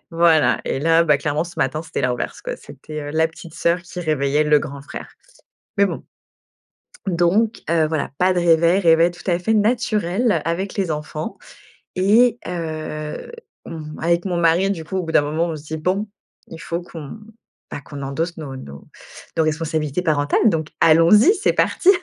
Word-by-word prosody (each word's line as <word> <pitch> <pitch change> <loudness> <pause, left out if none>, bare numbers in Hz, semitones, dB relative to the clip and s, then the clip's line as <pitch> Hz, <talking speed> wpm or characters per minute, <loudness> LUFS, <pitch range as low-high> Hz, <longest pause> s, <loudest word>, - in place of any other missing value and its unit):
Voilà 165 -2 +4
et - - -2
là 165 +3 +3
bah, 150 -4 +3
clairement 150 +2 -1
ce 175 - -11
matin, 155 +4 0
c'était 165 -1 -4
l'inverse 125 -1 -2
quoi. - - -5
C'était 155 0 -9
heu, 145 0 -6
la 160 +1 +2
petite 165 0 -13
sœur 170 +1 0
qui 180 +1 -8
réveillait 150 -2 +1
le 150 0 +5
grand 140 0 -7
frère. 140 - -9 0.7
Mais 200 - +5
bon - - -4 1.0
donc 190 +6 +1
heu, 165 -2 +3
voilà, 155 -1 -2
pas 185 +1 +3
de 180 - +1
réveil 170 +1 +4
réveil 165 -1 +4
tout 175 - -14
à 175 -1 +2
fait 220 +5 0
naturel 215 -1 +1
avec 180 +4 -2
les 190 -4 0
enfants 155 +5 -5 0.6
et 220 +6 +4
heu, 155 - -5 0.3
mmh, 155 -2 -8
avec 170 +2 +1
mon 180 -2 -1
mari 170 +3 +3
du 180 -5 -3
coup 190 +4 -4
au 185 - -1
bout 165 - -4
d'un 150 - +4
moment 155 +3 -1
on 165 - -3
se 150 - -10
dit: 160 +1 -5
«Bon 185 +7 -1 0.4
il 165 - -9
faut 170 +1 -4
qu'on, 165 +3 -9 0.5
bah 140 - -5
qu'on 140 -1 -8
endosse 160 +6 -3
nos 145 -4 -7
nos 70 - -10 0.5
nos 160 - +2
responsabilités 155 0 -1
parentales 145 +5 +2
donc 160 -4 -2
allons-y, 165 - +6
c'est 420 0 +1
parti!» 370 - +2
165 Hz, 185 wpm, -21 LUFS, 155-180 Hz, 1.0 s, allons-y